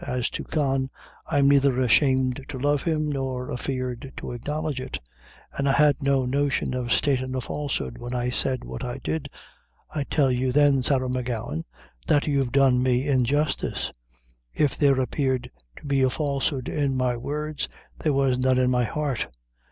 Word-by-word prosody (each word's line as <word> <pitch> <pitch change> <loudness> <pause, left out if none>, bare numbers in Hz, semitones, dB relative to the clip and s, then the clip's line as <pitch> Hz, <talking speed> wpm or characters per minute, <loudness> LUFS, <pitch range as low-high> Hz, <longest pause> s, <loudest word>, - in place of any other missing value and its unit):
As 125 -1 -2
to - - -4
Con, 135 -3 0 0.4
I'm 140 -1 +3
neither 140 -2 +4
ashamed 130 +1 +3
to 140 - -6
love 145 +2 +1
him, 155 -2 0
nor 130 -2 -3
afeard 130 +1 -4
to - - -5
acknowledge 145 +3 -3
it; - - -4 0.6
and 140 0 0
I - - +4
had 150 -1 +4
no 135 -2 +2
notion 140 0 0
of 125 -2 -2
statin' 130 -2 +1
a - - 0
falsehood 125 - -3
when 120 +1 -5
I 125 0 -1
said 130 0 +2
what - - -6
I 125 +1 -4
did. 155 -3 -2 0.6
I 145 -3 -1
tell 140 -3 +2
you, 125 +1 0
then, 140 -1 +4
Sarah 130 0 +2
M'Gowan, 120 -10 -3 0.4
that 145 - +3
you've 140 -4 +1
done 135 -2 +4
me 130 +1 +1
injustice. 140 +3 0 0.6
If 145 -3 +2
there 140 -3 +3
appeared 130 -1 -1 0.3
to - - -12
be 140 -1 +1
a 130 - +4
falsehood 140 -1 -1
in 140 -3 0
my 125 -1 +1
words, 150 +4 -3 0.3
there 155 - +1
was 135 -2 +2
none 130 0 +3
in 125 0 +3
my 125 -1 +2
heart." 145 0 -2
135 Hz, 170 wpm, -25 LUFS, 125-145 Hz, 0.6 s, neither